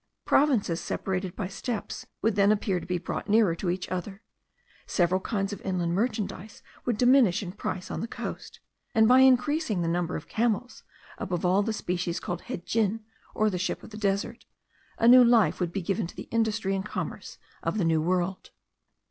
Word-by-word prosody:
Provinces 225 - +2
separated 190 -1 -3
by 200 - -3
steppes 205 +3 -5 0.2
would 225 0 +3
then 200 0 +4
appear 200 -3 0
to - - -10
be 180 0 0
brought 175 +4 -5
nearer 210 -4 +4
to 175 +2 -3
each 180 +1 -2
other; 195 +3 -5 0.6
several 185 +1 +1
kinds 200 0 -2
of - - -8
inland 175 -3 -1
merchandize 210 -1 -3 0.2
would 240 -4 0
diminish 245 -7 +4
in 180 - -5
price 185 -2 -5
on - - -3
the 230 - -3
coast; - - -7 0.4
and 220 0 +6
by 255 +2 +7
increasing 260 - +3
the - - -1
number 170 0 -1
of 155 - -6
camels, 235 +2 -1 0.4
above 180 -1 -2
all 185 +3 +4
the 225 +2 -1
species 180 -4 -2
called 175 0 -4
hedjin, 220 +4 -1 0.3
or 215 - +2
the 180 - -3
ship 185 - -2
of - - -12
the - - -9
desert, 210 +3 -2 0.5
a 230 - +3
new 250 +1 +9
life 235 -3 +4
would 175 -2 -1
be 195 0 -3
given 195 +1 -1
to - - -13
the - - -8
industry 220 -3 0
and 195 +2 -3
commerce - - -5 0.2
of - - -2
the 190 - +1
New 160 -1 +2
World. 180 +2 -1
200 Hz, 190 wpm, -27 LUFS, 180-225 Hz, 0.6 s, new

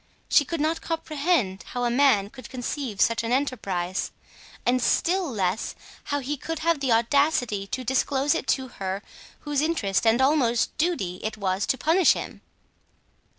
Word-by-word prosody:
She 290 - +5
could 335 +3 -3
not 315 +2 0
comprehend 305 - -1
how 245 - -5
a 240 - +1
man 235 -6 +3
could 255 -1 -11
conceive 250 -3 -4
such 230 - +3
an 230 0 -3
enterprise 195 -9 -1 0.6
and 250 +1 +2
still 360 +6 +1
less 200 -3 -1 0.3
how 285 0 -1
he 285 +3 -3
could 325 +4 -4
have 330 0 +1
the 270 -3 0
audacity 235 -3 +2
to 255 +5 -4
disclose 265 +3 +1
it 330 - -3
to 265 -1 +1
her 195 +1 -3 0.4
whose 290 -2 -1
interest 230 - 0
and 225 +2 +4
almost 265 -4 +2
duty 245 - -1
it 215 0 -4
was 190 -1 -1
to 265 - +1
punish 325 +7 +4
him. - - -7
255 Hz, 160 wpm, -25 LUFS, 215-295 Hz, 0.6 s, She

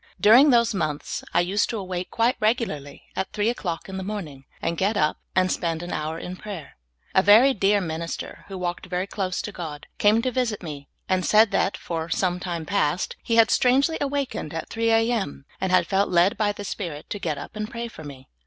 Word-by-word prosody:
During 245 +8 +7
those 235 -3 +4
months 155 -6 -3
I 175 - +3
used 190 +4 +1
to 230 - -2
awake 185 -2 -4
quite 235 +2 +2
regularly 215 - -1
at 190 - -2
three 210 +2 +1
o'clock 175 -8 -3
in 190 0 -6
the 190 - -4
morning, 170 -10 -6
and 165 +1 -1
get 200 +5 +1
up 150 0 +1 0.2
and 185 0 +3
spend 165 -1 -1
an 175 - -5
hour 155 +1 -3
in 180 +2 -6
pra3'er. 195 -8 -7 0.4
A 190 - +5
very 220 +8 +7
dear 200 -1 +3
minister, 165 -1 -5
who 195 -1 -7
walked 175 0 -3
very 180 +1 -1
close 190 -2 -3
to 210 - -5
God, 160 -6 -7
came 215 +2 +4
to 255 - 0
visit 235 -6 -1
me, 145 -4 -7 0.2
and 185 -1 +1
said 215 +3 +5
that, 195 - +1
for 165 -1 -4
some 180 0 0
time 170 -3 -4
past, 180 -3 0
he 230 - 0
had 230 0 +6
strangely 275 +6 +3
awakened 275 - -2
at 165 - -4
3 230 0 0
A. 225 +1 +3
M., 195 - -3 0.2
and 190 -1 0
had 185 - +4
felt 195 +1 +1
led 180 +2 +4
by 210 -1 +1
the 205 0 -7
Spirit 165 -8 -5
to 205 - -3
get 150 -6 -2
up 145 - -9
and 215 0 -4
pray 235 0 -5
for 195 -8 -11
me. 135 -3 -10
190 Hz, 220 wpm, -24 LUFS, 170-220 Hz, 0.4 s, During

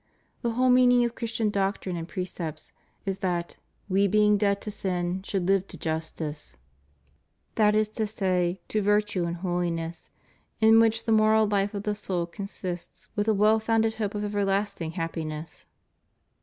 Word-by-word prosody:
The 235 -2 -1
whole 255 +2 +3
meaning 250 -1 +5
of 235 - -2
Christian 230 -3 -1
doctrine 195 -2 -1
and 165 -1 -5
precepts 175 -5 -5 0.3
is 195 -1 -2
that 175 -3 -2 0.3
we 200 +1 +3
being 210 +1 +4
dead 200 -1 +1
to 210 - -5
sin, 185 -2 -2
should 190 -2 -2
live 195 0 +2
to - - -10
justice 155 - -4 1.0
^ - - -42
that 210 -1 +4
is 215 0 +3
to 215 0 -2
say, 185 -3 0
to 215 - +1
virtue 205 -3 +1
and 170 0 -2
holiness, 170 -2 -3 0.5
in 225 0 +7
which 225 0 +2
the 225 - 0
moral 220 0 +5
life 205 0 0
of 200 - -3
the 210 - 0
soul 185 -4 -2
consists 185 +1 -7
with 205 0 0
the 220 - +3
well 215 +2 +4
foimded 225 0 +2
hope 210 -2 -2
of 210 - -2
everlasting 200 -4 -1
happi 165 -1 -3
ness. 155 +1 -7
200 Hz, 170 wpm, -27 LUFS, 175-215 Hz, 1.0 s, in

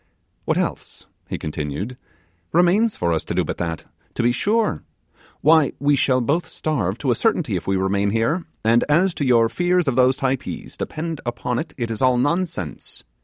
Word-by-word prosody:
'What - - +1
else,' - - -3 0.2
he - - -3
continued, 75 - -4 0.6
'remains 185 +6 +3
for 85 -1 0
us 80 - -1
to - - -4
do - - +2
but - - -5
that, 80 -2 -3 0.3
to 120 - 0
be 120 - +4
sure? 210 - 0 0.6
Why, 155 -1 +4
we 145 +1 +3
shall 130 -1 +2
both 150 +8 0
starve 115 - -2
to 135 - 0
a - - +2
certainty 175 - +1
if 90 - -4
we 95 - +2
remain 100 +2 +1
here; 115 - 0 0.2
and 115 +2 +4
as 175 +5 +3
to 145 - -3
your 120 -3 +4
fears 175 +7 +1
of 135 - +1
those 130 0 +4
Typees 135 0 -3
depend 160 -1 -4
upon 120 0 -2
it, 160 - -6
it 120 -3 -2
is 110 - -4
all 130 -1 +4
nonsense. 145 - -2
130 Hz, 185 wpm, -22 LUFS, 110-165 Hz, 0.6 s, be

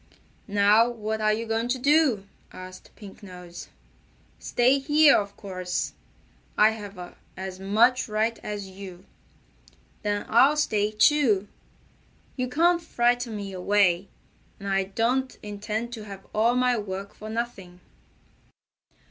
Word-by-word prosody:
"Now 205 +3 +4
what 220 -2 -4
are 215 0 +3
you 225 +2 -2
going 225 +1 -1
to 250 +2 0
do?" 275 -6 +3 0.3
asked 185 0 -11
Pink 205 -1 -13
Nose. 180 -3 -10 0.7
"Stay 255 +3 +2
here, 295 +1 +5
of 200 -1 -2
course. 185 -2 -4 0.6
I 215 +1 +6
have 200 -5 -9 0.2
as 190 0 -6
much 225 +6 +2
right 220 +2 0
as 205 -2 -5
you." 190 -1 -11 1.0
"Then 205 -1 -2
I'll 265 +6 +5
stay, 210 -8 +1
too. 215 -3 +3 0.9
You 255 -1 -2
can't 340 +5 +3
frighten 245 -6 0
me 200 -1 -6
away, 190 -1 +2 0.5
and 200 - -7
I 195 -1 +1
don't 240 +7 -1
intend 215 +3 -4
to 220 -3 -7
have 195 -2 -10
all 230 +3 +2
my 250 -2 +2
work 200 -1 -6
for 215 - -9
nothing." 220 -6 -5
215 Hz, 130 wpm, -26 LUFS, 195-240 Hz, 1.0 s, I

